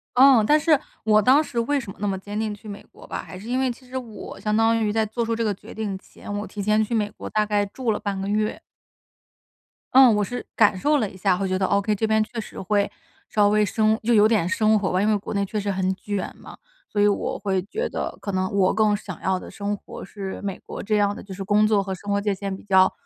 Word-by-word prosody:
嗯， 260 -3 +7
但 300 +4 +5
是， 305 -2 +3 0.2
我 215 0 +4
当 270 +8 +5
时 240 -5 -3
为 280 +5 +1
什 220 -6 -7
么 - - -15
那 205 - -1
么 190 -1 -1
坚 205 +2 -5
定 215 -1 -1
去 205 +1 -12
美 200 -1 -8
国 - - -15
吧， - - -5
还 185 - -10
是 210 +5 -10
因 255 +2 0
为 260 -2 +1
其 255 +1 -13
实 260 - -11
我 230 -4 -8
相 210 0 0
当 225 0 +3
于 210 - +1
在 220 0 +1
做 230 +3 -2
出 230 0 -1
这 230 - -1
个 210 -2 +1
决 - - -12
定 210 -3 -3
前， 205 - -11
我 210 - -5
提 205 - -6
前 215 +2 +2
去 235 - -4
美 210 -1 0
国 - - -8
大 215 0 +1
概 205 -1 +1
住 235 +2 -2
了 - - -1
半 200 -2 -3
个 195 - -3
月。 215 +1 0 1.3
嗯， 260 -3 +8
我 210 - +1
是 245 +5 -5
感 205 -3 +4
受 295 +8 +2
了 215 -7 0
一 - - -14
下， 185 -1 +1
会 195 0 -1
觉 185 0 0
得 190 - +1
okay， 200 +2 +1
这 220 - 0
边 220 0 +3
确 230 +1 -7
实 - - -10
会 200 +1 0 0.4
稍 205 -1 +3
微 210 0 +3
生 220 +1 +2
就 235 +2 +2
有 215 0 +6
点 210 -7 +2
生 215 +3 +3
活 190 - -1
吧， 185 +1 +1
因 210 - +2
为 215 -1 +3
国 200 - -6
内 200 0 0
确 210 +2 -3
实 200 0 -1
很 190 0 0
卷 205 -1 -4
嘛。 - - -13 0.3
所 205 - 0
以 205 - +5
我 205 - 0
会 190 -2 0
觉 445 - -3
得， - - -4
可 200 - -3
能 185 0 -1
我 195 -2 +3
更 215 -1 +3
想 190 -4 -8
要 190 -1 0
的 - - -10
生 205 0 -3
活 - - -10
是 195 0 -7
美 195 -2 -4
国 - - -8
这 210 0 +1
样 205 0 +2
的， - - -9
就 195 -1 -9
是 195 +1 -5
工 210 +2 +3
作 210 -2 +3
和 190 -1 -4
生 200 +3 -6
活 200 - +2
界 205 0 0
线 195 0 -4
比 - - -13
较 190 -2 +4
210 Hz, 305 characters per minute, -24 LUFS, 200-220 Hz, 1.3 s, 嗯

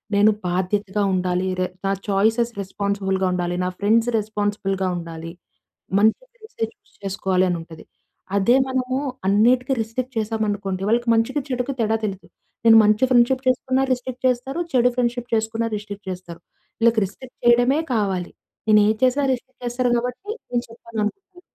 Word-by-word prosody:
నేను 210 +2 +6 0.2
బాధ్యతగా 190 +3 -1
ఉండాలి. 180 0 0
రే 185 - +2 0.2
నా 195 - +2 0.2
చాయిసేస్ 220 +4 +2
రెస్పాన్సిబుల్‌గా 195 -1 -1
ఉండాలి. 175 -1 -1
నా 180 - 0
ఫ్రెండ్స్ 225 +3 +3
రెస్పాన్సిబుల్‌గా 205 -2 -2
ఉండాలి. 165 -1 -7 0.7
మంచి 220 - +3
ఫ్రెండ్స్ 440 -2 -17
చూజ్ 225 0 -6
చేసుకోవాలి 190 -1 +1
అని 175 - 0
ఉంటది. 165 -1 -12 0.5
అదే 220 +6 +4
మనము 260 0 -1 0.3
అన్నిటికి 240 +6 +3
రిస్ట్రిక్ట్ 250 +4 -4
చేసాము 220 0 -1
అనుకోండి. 195 -2 -3
వాళ్ళకి 240 +1 +1
మంచికి 230 +6 +1
చెడుకి 250 +1 -2
తేడా 220 0 +2
తెలియదు. 195 -2 -4 0.4
నేను 225 -1 +8
మంచి 215 +4 +4
ఫ్రెండ్షిప్ 255 +2 +4
చేసుకున్న 260 +1 +1
రిస్ట్రిక్ట్ 255 0 -4
చేస్తారు. 255 +6 -2
చెడు 250 -1 +4
ఫ్రెండ్షిప్ 245 0 -1
చేసుకున్న 225 +1 0
రిస్ట్రిక్ట్ 205 -1 -8
చేస్తారు. 175 -2 -8 0.4
వీళ్ళకి 230 -1 +4
రిస్ట్రిక్ట్ 250 +6 -14
చేయడమే 245 +5 +4
కావాలి. 190 -5 -1 0.4
నేను 210 -1 +7
ఏది 215 0 +1
చేసినా 270 +3 +2
రిస్ట్రిక్ట్ 255 0 -7
చేస్తారు 245 +1 0
కాబట్టి 250 - -4 0.2
నేను 240 -1 0
చెప్పననుకున్న. 230 - -5
220 Hz, 145 wpm, -22 LUFS, 195-245 Hz, 0.7 s, నేను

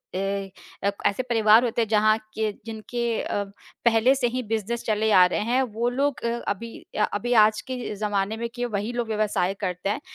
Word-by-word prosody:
ए 195 0 -2 0.3
अ, 200 - +3 0.2
ऐसे 230 +6 +1
परिवार 225 -2 +5
होते 235 -1 0
हैं 225 - 0
जहाँ 215 0 +4 0.2
के 220 -1 -1
जिनके 225 +2 -5 0.2
अ, 205 - -2 0.4
पहले 235 +3 +5
से 255 -2 +1
ही 255 +2 -2
बिज़नेस 225 +1 -2
चले 220 0 +1
आ 185 -2 +7
रहे 180 - 0
हैं, 255 +2 +3
वो 235 0 -1
लोग 275 +2 -1
अ, - - +2 0.2
अभी 230 +3 -3 0.3
अ - - +4
अभी 240 +4 -1
आज 215 0 +3
के 250 -4 -4
ज़माने 205 +1 -1
में 235 0 -3
कि 245 0 -2
वही 215 -1 -2
लोग 240 -1 -2
व्यवसाय 210 -4 0
करते 180 0 -2
हैं, 215 +7 -2
220 Hz, 200 wpm, -25 LUFS, 205-240 Hz, 0.4 s, आ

